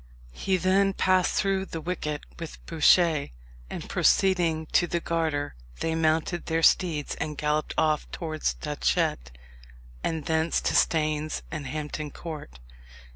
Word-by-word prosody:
He 190 - 0
then 195 +2 +3
passed 185 -1 +2
through 195 -1 +1
the 165 - -6
wicket 155 -3 -3 0.2
with 165 -2 -7
Bouchier, 165 - +4 0.4
and - - -6
proceeding 170 -4 +2
to 175 - +3
the 170 - -1
Garter, 160 -4 -1 0.3
they 165 - -1
mounted 160 +2 0
their 165 0 0
steeds, 160 -6 +3
and 150 -1 -3
galloped 150 +1 -1
off 155 -1 +1
towards 155 - -2
Datchet, - - -1 0.7
and 160 -3 -2
thence 160 0 +1
to - - 0
Staines 155 -1 +1
and 150 -4 -4
Hampton 150 +1 -4
Court. 150 - -8
160 Hz, 130 wpm, -27 LUFS, 150-175 Hz, 0.7 s, Bouchier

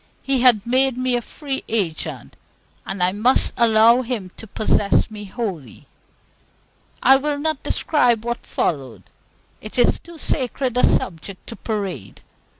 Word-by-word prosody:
He 270 -2 +1
had 240 -5 +5
made 260 +1 +2
me 255 -1 0
a 240 - 0
free 275 +2 -4
agent, 190 -8 -3 0.5
and 195 -2 -2
I 180 - +3
must 220 +7 +2
allow 230 +1 +5
Him 225 -7 -4
to 225 - -10
possess 210 +1 +1
me 210 -1 -8
wholly. 190 - -6 1.2
I 270 +2 +7
will 290 +1 -1
not 310 -1 -2
describe 240 -7 +1
what 240 0 -3
followed. 135 -8 -3 0.6
It 215 - -9
is 245 - +3
too 340 -1 -13
sacred 260 -4 -2
a 250 - +2
subject 180 +2 -1
to 230 - -7
parade. 200 - -5
235 Hz, 145 wpm, -21 LUFS, 200-255 Hz, 1.2 s, I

